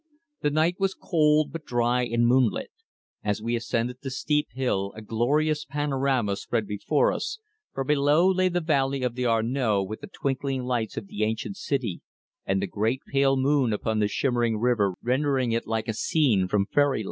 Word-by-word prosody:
The 150 - +2
night 160 +4 +1
was 195 0 0
cold 150 -2 +2
but 165 -1 -6
dry 120 0 +1
and 120 0 +1
moonlit. 125 -1 +2 0.5
As 105 -1 -1
we 115 +2 -1
ascended 120 +1 -2
the 135 - -4
steep 150 +3 0
hill 110 -6 -1
a 110 - -8
glorious 150 +8 +1
panorama 135 -7 0
spread 115 0 -2
before 105 - +1
us, 465 - -3 0.3
for 135 - -3
below 150 +4 +3
lay 185 -1 +3
the 175 0 -1
valley 140 -4 0
of 125 -2 0
the 125 +1 -2
Arno 115 -2 +1
with 110 +3 -7
the - - -7
twinkling 135 -6 -2
lights 120 -3 -2
of - - -4
the 100 - -7
ancient 110 - -2
city, 130 - -2 0.5
and 95 0 +1
the - - +1
great 110 +6 -1
pale 135 -1 +3
moon 135 -2 +2
upon 110 +1 -1
the 105 - +2
shimmering 120 -1 0
river 105 -5 +1
rendering 130 0 +1
it 115 +1 -1
like 110 0 -2
a 110 - -1
scene 110 - +2
from 100 +1 +1
fairyland. 145 +1 +2
125 Hz, 180 wpm, -26 LUFS, 110-145 Hz, 0.5 s, below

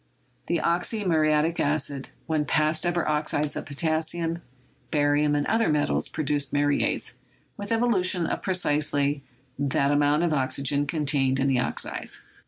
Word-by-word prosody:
The 170 - +1
"oxymuriatic 170 -4 +1
acid/' 145 -2 -1 0.2
when 155 -2 0
passed 155 +3 +1
over 175 -1 0
oxides 150 -1 0
of - - -5
potassium, 160 +3 -1 0.5
barium, 145 0 +2
and 145 0 0
other 225 0 +1
metals, 150 -1 +1
produced 145 -2 -1
"muriates" 145 0 0 0.4
with 205 +2 -7
evolution 195 -7 +2
of - - -3
precisely 145 -5 0 0.4
that 140 0 +1
amount 145 +2 +2
of 170 -2 +1
oxygen 140 +1 0
contained 140 -3 0
in 135 - +1
the 130 -2 +2
oxides. 120 - -3
150 Hz, 130 wpm, -25 LUFS, 145-170 Hz, 0.5 s, barium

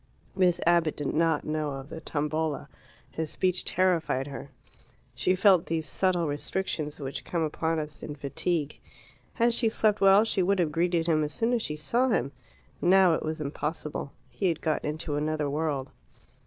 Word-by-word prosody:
Miss 180 -2 +3
Abbott 170 -2 +3
did 145 - -2
not 160 -1 +2
know 155 -1 -2
of 135 +1 -8
the 160 - -7
Tombola. 155 0 -2 0.4
His 160 -1 -3
speech 185 +2 +1
terrified 170 -7 +1
her. 140 0 -8 0.6
She 185 - +1
felt 190 -3 +4
those 160 -1 -1
subtle 175 +3 +1
restrictions 150 0 -3
which 135 -1 -5
come 170 -2 -2
upon 160 +1 -1
us 150 -1 -5
in 150 - -6
fatigue. 150 +2 -2 0.5
Had 235 0 +2
she 230 -1 +2
slept 215 -1 +1
well 195 +2 +7
she 220 -3 0
would 195 +2 +2
have 170 -4 +1
greeted 170 +1 +1
him 155 -2 +2
as 150 0 -3
soon 230 +2 +1
as 240 - +1
she 150 - -3
saw 235 - +1
him. 140 - 0 0.5
Now 185 -1 +5
it - - -1
was 155 0 -3
impossible. 150 0 -4 0.2
He 125 +10 -1
had 165 -3 0
got 155 -2 -1
into 150 -1 -3
another 150 0 -1
world. 145 -2 -2
160 Hz, 175 wpm, -28 LUFS, 150-180 Hz, 0.6 s, well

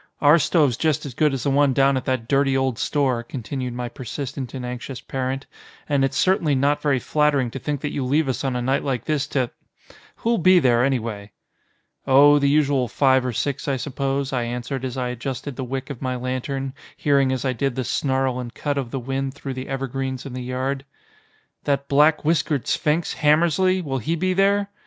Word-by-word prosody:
Our 150 +3 +6
stove's 145 -7 +2
just 155 -4 0
as 135 - -6
good 150 +5 +2
as 135 -3 -3
the 140 - +1
one 140 -1 +3
down 135 +1 +3
at 130 -1 -2
that 130 -3 -1
dirty 135 0 +2
old 130 -3 0
store," 135 -5 +1
continued 125 +1 -5
my 125 0 -3
persistent 130 +2 -6
and 125 -1 -5
anxious 125 +1 -6
parent, 135 +1 -3 0.4
"and 140 -2 +2
it's 135 - 0
certainly 170 -6 +2
not 140 +2 +1
very 140 -3 +2
flattering 145 -2 +1
to 135 - -6
think 145 +1 -3
that 150 - -3
you 140 - -2
leave 145 +4 +1
us 130 - -2
on 130 -2 -1
a 125 - -1
night 135 +2 +1
like 130 -5 -2
this 150 -2 0
to 130 -4 -1 0.6
Who'll 230 -1 0
be 185 +2 +6
there, 120 -7 +4
anyway?" 115 -6 -2 0.7
"Oh, 145 +2 +7
the 140 0 +2
usual 140 -3 +2
five 130 +1 +3
or 125 - -1
six 140 +5 -2
I 135 -2 +1
suppose," 135 0 -2
I 125 - +1
answered 125 +2 -4
as 130 0 -4
I 125 -1 -1
adjusted 130 +2 -5
the 130 - -4
wick 135 +2 -4
of 130 - -8
my 130 -1 -2
lantern, 130 +2 -3 0.2
hearing 140 -2 +2
as 130 0 -2
I 130 - +1
did 135 +1 -1
the 130 - -1
snarl 130 0 0
and 120 -1 -5
cut 145 -1 -1
of 130 -4 -4
the 135 - -3
wind 135 +2 -3
through 140 -1 -5
the 130 0 -6
evergreens 135 -1 -3
in 135 - -7
the 130 - -5
yard. 130 +2 -2 0.8
"That 140 -1 0
black 150 +2 +4
whiskered 155 -4 +1
sphinx, 160 +1 0
Hammersly, 170 +5 +3
will 135 -4 -2
he 160 +9 -1
be 185 +3 0
there?" 200 +1 +2
135 Hz, 210 wpm, -23 LUFS, 130-145 Hz, 0.8 s, Oh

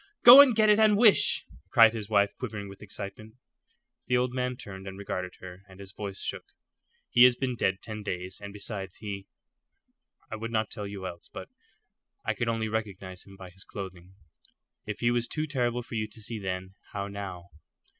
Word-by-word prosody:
"Go 255 +4 +12
and 260 -5 +5
get 215 0 +4
it 210 - +4
and 215 -2 +5
wish," 220 -2 +5 0.2
cried 115 -1 +7
his 110 -2 -6
wife, 100 -2 +3
quivering 105 -5 -5
with 100 0 -12
excitement. 105 +1 -8 0.7
The 125 - +3
old 125 0 0
man 125 0 -1
turned 95 -6 -9
and 95 0 -7
regarded 90 -2 -5
her, 95 0 -10
and 95 0 -15
his 100 -1 -9
voice 100 -1 -6
shook. - - -6 0.6
"He 120 - +4
has 125 0 +8
been 125 -1 -2
dead 95 -4 -1
ten 110 -1 -6
days, 95 -1 -5
and 100 0 -7
besides 100 -2 -6
he 100 -2 -7 1.0
I 110 - -4
would 115 +1 -5
not 110 -1 -1
tell 105 -2 -5
you 100 -1 -7
else, 85 -2 -8
but - - -8 0.8
I - - +1
could 120 - -2
only 115 -1 0
recognize 100 -4 -5
him 95 0 -14
by 95 -1 -11
his 95 +1 -9
clothing. 95 -2 -9 0.7
If 105 - -5
he 120 0 +3
was 120 0 0
too 155 +5 -2
terrible 125 -4 -1
for 115 - -12
you 110 -1 -1
to 105 - -13
see 110 +1 -4
then, 95 -1 -4 0.2
how 100 -1 -3
now?" 95 -3 -7
105 Hz, 195 wpm, -28 LUFS, 95-120 Hz, 1.0 s, Go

